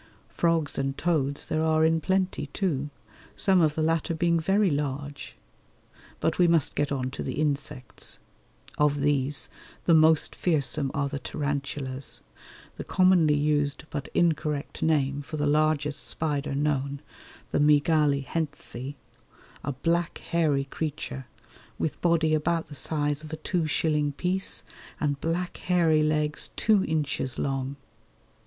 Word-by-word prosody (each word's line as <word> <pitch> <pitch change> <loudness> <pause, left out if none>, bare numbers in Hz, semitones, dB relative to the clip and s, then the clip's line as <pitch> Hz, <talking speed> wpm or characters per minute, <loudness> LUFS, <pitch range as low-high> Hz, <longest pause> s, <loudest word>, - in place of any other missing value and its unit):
Frogs 165 -4 0
and 135 0 -2
toads 145 -4 0
there 155 - -1
are 160 0 +3
in 160 0 +2
plenty, 190 -5 0
too, 145 -3 -2 0.5
some 190 -2 +3
of 155 -2 +2
the 155 - 0
latter 165 +1 0
being 170 0 +2
very 195 +3 +2
large; 145 0 -4 0.8
but 160 - 0
we 175 - +6
must 165 -4 +3
get 145 0 -1
on 130 -2 -2
to - - -6
the - - -4
insects. 145 -3 -2 0.6
Of 145 -1 +2
these 145 -1 +1 0.4
the 170 - +5
most 160 -1 +5
fearsome 145 -4 +1
are 140 0 0
the 140 0 -4
tarantulas, 140 -2 -4 0.5
the - - -5
commonly 180 -5 +4
used 145 -1 +1
but 145 -3 -4
incorrect 155 -3 0
name 145 -3 +1
for 155 +2 -6
the 150 - 0
largest 150 0 +1
spider 145 -3 -2
known, 140 -1 -1 0.5
the - - +1
Mygale 150 -1 +3
Hentzi, 145 -3 -4 0.7
a 145 - -2
black 170 +5 0
hairy 155 -5 +1
creature 135 -2 -5 0.5
with 155 - -3
body 165 -2 +3
about 165 +2 +1
the - - -12
size 145 0 0
of 155 - -9
a 155 - -4
two 165 +1 -1
shilling 150 -2 +1
piece 185 +5 +2 0.4
and 145 -2 -1
black 175 +2 -2
hairy 170 -4 +2
legs 150 0 0
two 215 -3 +3
inches 145 -5 -1
long. 135 0 -2
150 Hz, 140 wpm, -27 LUFS, 140-160 Hz, 0.8 s, we